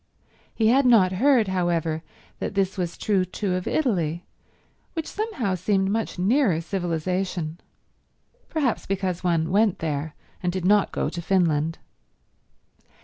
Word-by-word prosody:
He 220 -1 +3
had 265 +2 +4
not 205 -7 +5
heard, 235 +3 +3
however, 170 -3 0 0.4
that - - -4
this 195 -1 +1
was 175 -3 -3
true 200 -3 +1
too 185 +1 -3
of 180 0 -2
Italy, 175 - 0 0.7
which 320 -2 -3
somehow 390 - -2
seemed 190 +1 +1
much 220 -2 -2
nearer 200 - +2
civilization—perhaps 180 - -4
because 185 -2 -2
one 165 -2 +1
went 205 0 +3
there, 150 -1 -3 0.3
and 180 - 0
did 185 -1 -3
not 205 +1 +4
go - - -1
to 175 - -5
Finland. 165 -4 +1
185 Hz, 130 wpm, -24 LUFS, 170-215 Hz, 0.7 s, not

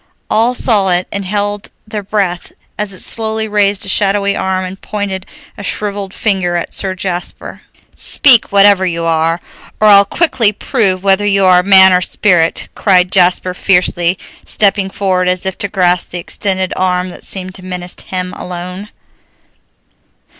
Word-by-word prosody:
All 230 +3 +2
saw 210 -6 +2
it 180 0 +1
and 200 -1 -4
held 205 +1 -3 0.2
their 215 -1 -5
breath 195 -3 -3 0.2
as 210 -1 -4
it 185 - -5
slowly 220 -1 +1
raised 205 -1 0
a - - -6
shadowy 200 0 +1
arm 190 0 -2
and 185 +1 -9
pointed 200 -3 -5 0.3
a - - -7
shriveled 200 -1 -3
finger 190 -5 -1
at 170 - -4
Sir 190 -1 -1
Jasper. 180 -1 -5 0.3
"Speak, 255 -6 +3
whatever 200 -1 +5
you 170 -2 -2
are, 165 0 0 0.4
or 215 - +4
I'll 200 -1 +7
quickly 240 - +1
prove 195 -5 -1
whether 200 +1 +2
you 195 -1 +2
are 180 -1 +5
man 190 0 +6
or 180 - +2
spirit!" 175 -3 +1
cried 180 -3 +2
Jasper 180 0 +2
fiercely, 180 -1 +1 0.3
stepping 200 -2 +1
forward 185 -2 -1
as 180 +1 -1
if 190 -1 -1
to 205 - -2
grasp 180 -2 0
the 180 - -4
extended 190 +1 -1
arm 180 0 -1
that - - -10
seemed 185 -1 -2
to 185 - -11
menace 180 -1 -5
him 185 -1 -4
alone. 180 +3 -7
190 Hz, 160 wpm, -13 LUFS, 180-205 Hz, 0.4 s, I'll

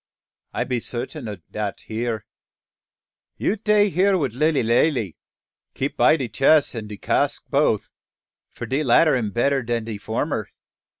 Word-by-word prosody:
"I - - -1
be 125 -2 -2
sartin 125 +3 -5
ob 105 -4 -7
dat 105 -2 -4
ere. 110 -1 -3 1.1
You 205 - 0
tay 210 -1 +3
here 190 +2 +3
wif 140 -9 -1
Lilly 150 +1 +2
Lally. 115 - +1 0.6
Keep 135 +2 -2
by 160 - +5
de 130 -5 -3
chess 140 +7 +3
and 110 -3 -6
de 105 - -7
cask - - 0
boaf, - - +1 0.6
for - - -7
de 135 +4 -1
latter 145 +4 +4
am 115 -4 -1
better 135 +5 +1
dan 120 -1 -2
de 110 -2 -6
former. - - -2
125 Hz, 155 wpm, -23 LUFS, 110-155 Hz, 1.1 s, by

